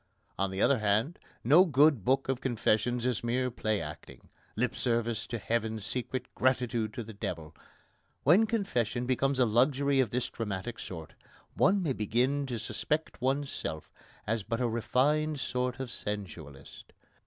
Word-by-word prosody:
On 100 0 +1
the 95 +1 -1
other 140 -4 +4
hand, 110 - +1 0.2
no 150 +10 +7
good 145 - +4
book 135 +5 +2
of 130 -1 -1
confessions 120 0 +1
is 125 -2 0
mere 125 +2 0
play 110 -3 -1
acting 75 -2 -9 0.3
lip 125 +3 0
service 115 -1 -1
to 120 - -3
heaven, 110 +1 -1
secret 125 +4 -3
gratitude 125 -4 +1
to 120 - -4
the 110 +1 -10
devil. 85 -6 -5 0.7
When 190 +10 +5
confession 125 - -1
becomes 135 +2 +1
a 125 - +4
luxury 135 +4 +2
of 130 -5 +3
this 125 +3 -1
dramatic 110 0 -4
sort, 80 -4 -8 0.4
one 195 0 +3
may 145 -6 0
begin 125 +6 0
to 120 -2 -3
suspect 140 +8 -2
oneself 135 - -2 0.3
as 115 +1 0
but 115 +4 -3
a 125 - +1
refined 145 +6 +1
sort 125 -1 -2
of 130 -3 -4
sensualist. 80 -9 -7
120 Hz, 155 wpm, -30 LUFS, 110-135 Hz, 0.7 s, no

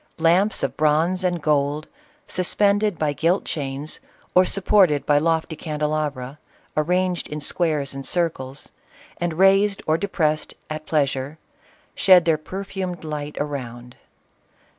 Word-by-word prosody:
Lamps 175 +6 +2
of - - -1
bronze 160 +5 +2
and 175 -3 -1
gold, 150 0 +1 0.4
suspended 200 +1 +1
by 150 -2 0
gilt 170 +6 +1
chains 140 0 -4 0.3
or 185 0 +6
supported 185 -6 +3
by 145 0 +4
lofty 160 +1 0
candelabra, 150 -3 -3 0.4
arranged 180 +3 0
in 150 - -5
squares 150 -3 0
and 135 0 -6
circles, 140 -4 -2 0.5
and 170 -2 -2
raised 195 +2 +3
or 155 +1 +1
depressed 155 -6 -1 0.2
at 155 0 -6
pleasure, 140 -1 -1 0.6
shed 185 -3 +6
their 160 -2 +2
per 190 +5 -6
fumed 185 -3 -5
light 150 -1 -5
around. 125 -4 -5
155 Hz, 125 wpm, -22 LUFS, 145-180 Hz, 0.6 s, or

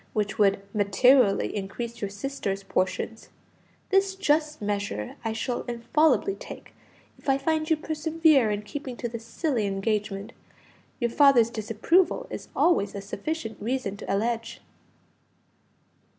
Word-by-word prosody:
which 210 0 -1
would 200 -1 +4
materially 210 +2 +4
increase 230 +4 -5
your 200 - -2
sisters' 200 -2 -4
portions; 195 +4 -2 0.6
this 390 0 +3
just 305 -4 +1
measure 205 - -3
I 225 - -1
shall 240 +2 -2
infallibly 260 +9 +2
take - - -10 0.5
if - - -5
I 270 - +4
find 310 +2 0
you 320 - +3
persevere 310 -4 +2
in 210 0 -2
keeping 260 +2 -6
to 240 - -3
this 230 -1 -7
silly 235 -3 -1
engagement. 200 0 -2 0.7
Your 235 -2 0
father's 250 -5 +5
disapproval 225 - +1
is - - -6
always 205 - +2
a - - -3
sufficient 225 +5 -5
reason 230 -3 -2
to - - -5
allege." 230 +3 -1
235 Hz, 130 wpm, -26 LUFS, 205-295 Hz, 0.7 s, father's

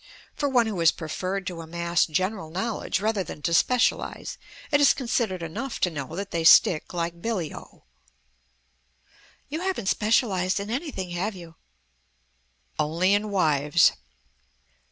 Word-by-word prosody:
For 285 - -1
one 245 -3 +3
who 210 -5 -3
has 165 -1 +5
preferred 185 +4 -4
to 175 -3 -5
amass 170 +1 0
general 185 +1 -2
knowledge 195 +7 -2
rather 215 -2 0
than 150 -3 -9
to 170 - 0
specialize, 250 +7 +1 0.3
it 290 -1 +4
is 285 - +6
considered 230 -8 -1
enough 225 +11 -5
to 180 - +2
know 150 0 -6
that 200 +2 -5
they 165 -1 -1
stick 160 0 +6
like 170 -1 -3
billy 195 -8 -2
o." - - -13 1.6
"You 310 +4 -4
haven't 365 - -1
specialized 200 -4 +1
in 200 +2 -5
anything, 240 - -4
have 190 +4 -2
you?" 170 -3 -11 1.3
"Only 165 +6 +2
in 210 +1 +1
wives." 155 -4 +3
185 Hz, 140 wpm, -25 LUFS, 170-220 Hz, 1.6 s, is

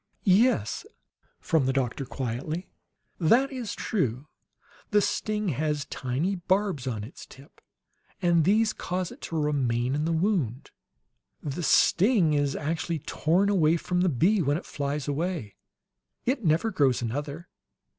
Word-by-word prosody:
"Yes," 195 - +3 0.6
from 155 -5 +1
the 135 - +1
doctor, 135 0 -1
quietly. 135 +7 -4 0.5
"That 235 - +4
is 250 -5 -5
true. 135 - -1 0.6
The 210 - +4
sting 210 0 -1
has 150 0 -1
tiny 145 +9 -2
barbs 185 -6 0
on 110 -5 -3
its 115 - -10
tip, 135 +1 -17 0.6
and 170 -3 +3
these 215 +5 +3
cause 180 -1 -3
it - - -13
to 165 - -3
remain 130 -4 0
in 150 +2 0
the 165 - 0
wound. 160 - 0 0.7
The 145 +3 -4
sting 180 +1 +4
is 145 -1 +1
actually 165 +2 -2
torn 170 +6 +1
away 170 -5 +3
from 180 +2 -1
the 185 - +3
bee 180 - +2
when 145 -1 +1
it 175 - -8
flies 140 0 -3
away. 150 - -2 0.7
It 255 -1 0
never 165 +7 +2
grows 135 - +2
another. 145 +7 -4
160 Hz, 140 wpm, -27 LUFS, 140-185 Hz, 0.7 s, That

